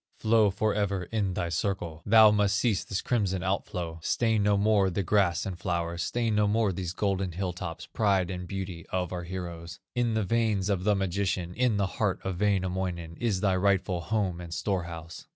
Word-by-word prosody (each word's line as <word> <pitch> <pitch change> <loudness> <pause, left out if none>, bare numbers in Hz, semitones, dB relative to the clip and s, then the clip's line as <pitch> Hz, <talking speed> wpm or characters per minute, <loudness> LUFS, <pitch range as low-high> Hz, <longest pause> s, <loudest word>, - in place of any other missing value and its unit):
Flow 110 -1 +4
forever 100 -1 0
in 100 -5 0
thy 85 -2 -1
circle; 85 -2 -2
Thou 110 0 +8
must 105 -1 +2
cease 105 -4 +1
this 100 - -3
crimson 95 -6 0
out 95 +1 -1
flow; 85 -2 -5
Stain 110 +4 +1
no 100 0 +3
more 100 -1 +3
the 95 +2 -1
grass 95 -2 +2
and 90 -3 -5
flowers, 85 -1 -2
Stain 115 +1 0
no 105 0 +3
more 105 -1 +2
these 90 -1 -3
golden 95 -1 -1
hill 90 0 -2
tops, 85 -1 -6
Pride 100 -5 +1
and 90 -1 -5
beauty 95 -4 -5
of 90 -1 -2
our 90 -1 -4
heroes. 85 -2 -6
In 120 -2 0
the 110 - +1
veins 105 -2 +1
of 95 -1 -1
the 105 -1 +4
magician, 95 -2 -1
In 120 -2 +1
the 100 - +2
heart 95 +1 -1
of 95 -1 -4
Wainamoinen, 95 -4 -1
Is 105 -6 0
thy 95 -3 +2
rightful 95 -2 +1
home 95 -3 -1
and 85 -1 -8
storehouse. 85 -3 -4
95 Hz, 190 wpm, -28 LUFS, 90-105 Hz, -, Thou